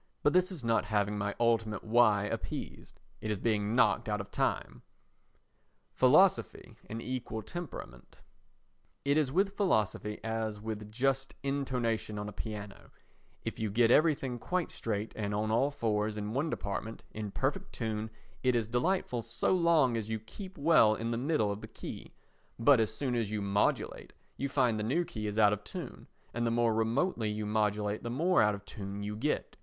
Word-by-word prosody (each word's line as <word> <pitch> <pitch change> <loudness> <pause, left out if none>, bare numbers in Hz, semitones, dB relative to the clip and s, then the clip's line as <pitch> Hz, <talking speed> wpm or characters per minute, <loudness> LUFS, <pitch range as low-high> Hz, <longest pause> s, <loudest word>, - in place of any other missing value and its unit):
But 145 - +4
this 185 +1 +3
is 165 -9 -7
not 115 -2 +2
having 105 0 0
my 100 0 -2
ultimate 115 -3 +1
"Why?" 110 -3 +4
appeased. 105 - -5 0.2
It 110 - -3
is 105 - 0
being 105 +1 0
knocked 125 -3 +3
out 105 0 0
of 100 - -7
time. - - -1 1.1
Philosophy 130 - +3
and 110 - -4
Equal 120 -3 -4
Temperament 125 - -8 0.9
It 140 0 +3
is 150 -4 +2
with 195 +5 +1
philosophy 105 - 0
as 110 -1 -2
with 105 -1 -6
just 135 +3 0
intonation 125 -6 -1
on 105 0 -4
a - - -5
piano, 105 -1 -7 0.6
if - - -4
you 110 -1 -1
get 115 +3 +4
everything 140 -6 +3
quite 180 +6 -1
straight 110 -1 -3
and 105 -1 -2
on 110 +1 0
all 125 +5 +3
fours 110 -5 -1
in 105 +1 -3
one 140 +6 0
department, 110 -2 -4
in 105 -1 -5
perfect 150 - -2
tune, 110 -1 -3 0.3
it 125 -1 +2
is 115 -3 +1
delightful 125 +1 0
so 115 +9 0
long 165 -8 +4
as 110 -1 -4
you 110 0 -1
keep 185 - -10
well 140 -8 +5
in 115 +1 -3
the - - 0
middle 125 -7 +1
of 100 +1 -5
the - - -7
key; - - -8 0.5
but 120 +2 +6
as 110 -1 +2
soon 125 +3 -2
as 115 -4 0
you 105 0 -2
modulate 100 0 0 0.2
you 140 - -2
find 125 -5 +2
the - - -1
new 150 +11 +1
key 110 -8 -5
is 105 +1 -4
out 105 -1 +6
of 105 0 -4
tune 150 - -8 0.3
and 120 0 0
the - - +2
more 115 -1 +2
remotely 115 - +1
you 105 0 -3
modulate 105 0 0
the 120 - -4
more 170 +9 +3
out 105 -1 +3
of 100 0 -12
tune 100 -1 -6
you 105 +1 -3
get. 145 +8 -2
115 Hz, 180 wpm, -31 LUFS, 105-135 Hz, 1.1 s, but